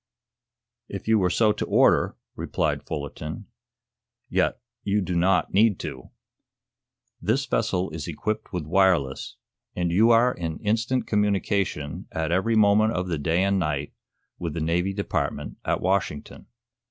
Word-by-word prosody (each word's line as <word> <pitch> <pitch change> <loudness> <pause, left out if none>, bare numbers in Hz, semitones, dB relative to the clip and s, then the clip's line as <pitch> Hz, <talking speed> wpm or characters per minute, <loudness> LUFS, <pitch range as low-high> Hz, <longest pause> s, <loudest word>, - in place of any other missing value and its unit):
"If - - -7
you 110 -1 +4
were 90 -2 +2
so 110 +4 +3
to - - -3
order," - - +3 0.2
replied - - -1
Fullerton. 70 -3 -5 0.8
"Yet - - +1 0.2
you 105 +1 +1
do 95 -2 -2
not 90 +2 +2
need 105 -1 +4
to. 65 -1 -7 1.1
This 115 +10 +1
vessel 95 -8 0
is 80 -2 -6
equipped 105 +7 -3
with 90 -5 -3
wireless, 85 -6 +1 0.4
and 90 -1 0
you 110 +7 +4
are 120 +2 +5
in 80 -2 -4
instant 115 +4 0
communication, 100 -7 -1
at 80 0 -2
every 95 +6 +2
moment 110 +1 +4
of 90 0 -2
the 80 -4 -1
day 85 +5 +1
and 100 0 +2
night, 75 -4 -2 0.5
with 85 -4 -4
the - - -2
Navy 85 +4 0
Department 100 - -3
at - - -1
Washington." 95 -6 -2
95 Hz, 140 wpm, -25 LUFS, 85-105 Hz, 1.1 s, are